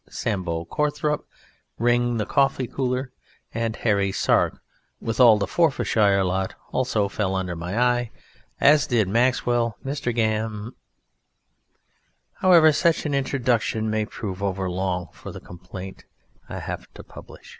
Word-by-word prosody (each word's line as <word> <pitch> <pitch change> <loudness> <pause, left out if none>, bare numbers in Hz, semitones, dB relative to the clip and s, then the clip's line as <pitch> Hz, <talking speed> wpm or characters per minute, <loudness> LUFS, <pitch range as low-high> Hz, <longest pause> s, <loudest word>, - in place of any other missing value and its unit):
"Sambo" 85 -5 -3
Courthorpe, 150 - -1 0.5
Ring, 120 0 +2
the 105 - -1
Coffee 135 -1 +1
cooler, 130 +1 -2 0.4
and 115 -1 -2
Harry 100 -3 +1
Sark, 95 - +1 0.4
with 115 +1 -4
all 115 -4 +8
the 100 - 0
Forfarshire 105 - +2
lot, 95 +1 -1 0.2
also 115 -6 0
fell 95 -1 -2
under 90 -2 -2
my 90 +5 -4
eye, 120 -1 +1 0.5
as 150 +1 +5
did 115 -7 +2
Maxwell, 120 +1 +1
Mr. 135 -2 -2
Gam 110 0 -1 1.6
However, 170 -4 +6
such 165 +2 +1
an 145 - -1
introduction 120 -5 0
may 110 0 0
prove 100 -3 -6
overlong 95 -2 -2
for - - -9
the - - -9
complaint 90 +2 -10 0.4
I - - -5
have - - -6
to - - -10
publish. - - -13
115 Hz, 130 wpm, -24 LUFS, 95-130 Hz, 1.6 s, all